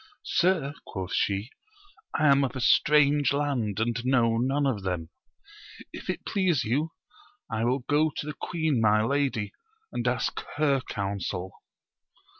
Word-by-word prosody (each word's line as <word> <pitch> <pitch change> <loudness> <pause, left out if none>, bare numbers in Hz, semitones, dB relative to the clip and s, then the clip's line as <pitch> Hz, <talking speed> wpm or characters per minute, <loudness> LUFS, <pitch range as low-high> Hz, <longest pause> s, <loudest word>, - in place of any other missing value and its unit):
Sir, 175 -6 +1
quoth 95 -2 -5
she, 100 +5 0 0.7
I 155 - +2
am 140 0 +4
of 135 - -2
a - - -3
strange 145 +2 +4
land, 130 -8 -1
and 120 +2 -1
know 120 -3 +3
none 135 +4 +1
of 125 -7 0
them: 90 -3 -3 0.8
if - - -9
it - - -3
please 180 -9 +1
you, 145 +9 -1 0.6
I 110 +1 0
will 125 +1 0
go 150 +2 +3
to - - -3
the 150 - -4
queen 155 -5 -1
my 110 0 +4
lady 135 -5 0 0.4
and - - -2
ask - - 0 0.2
her 140 -3 +2
counsel. 95 -2 -3
130 Hz, 145 wpm, -27 LUFS, 110-145 Hz, 0.8 s, am